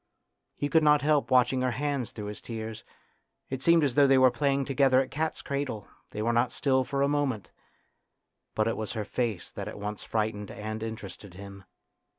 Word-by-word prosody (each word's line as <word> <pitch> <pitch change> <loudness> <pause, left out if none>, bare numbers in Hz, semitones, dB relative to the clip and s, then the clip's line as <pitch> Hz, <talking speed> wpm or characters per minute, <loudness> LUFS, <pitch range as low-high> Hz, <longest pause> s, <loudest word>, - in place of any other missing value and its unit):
He 145 - -2
could 160 +2 +4
not 150 -1 +4
help 150 -1 +2
watching 130 0 +3
her 130 - +1
hands 140 -4 -1
through 105 - -7
his 105 0 -7
tears; 110 -1 -6 0.7
it 130 -1 -3
seemed 170 +1 +5
as 140 -4 +1
though 145 +1 +5
they 135 0 +5
were 130 -1 +6
playing 140 +2 0
together 135 -1 +3
at 130 - -1
cat's 160 +2 -2
cradle; 140 -8 -3 0.2
they 105 - -4
were 120 +1 +1
not 120 +1 +2
still 130 -2 +1
for 140 +1 -1
a - - +3
moment. 135 -10 -1 1.0
But 110 - +1
it 115 - -1
was 110 -1 -4
her 110 -3 -3
face 110 -4 -3
that - - -6
at - - -7
once 105 0 -5
frightened 105 -2 -2
and 110 +1 -5
interested 105 -4 -7
him. 100 0 -10
125 Hz, 195 wpm, -28 LUFS, 110-140 Hz, 1.0 s, were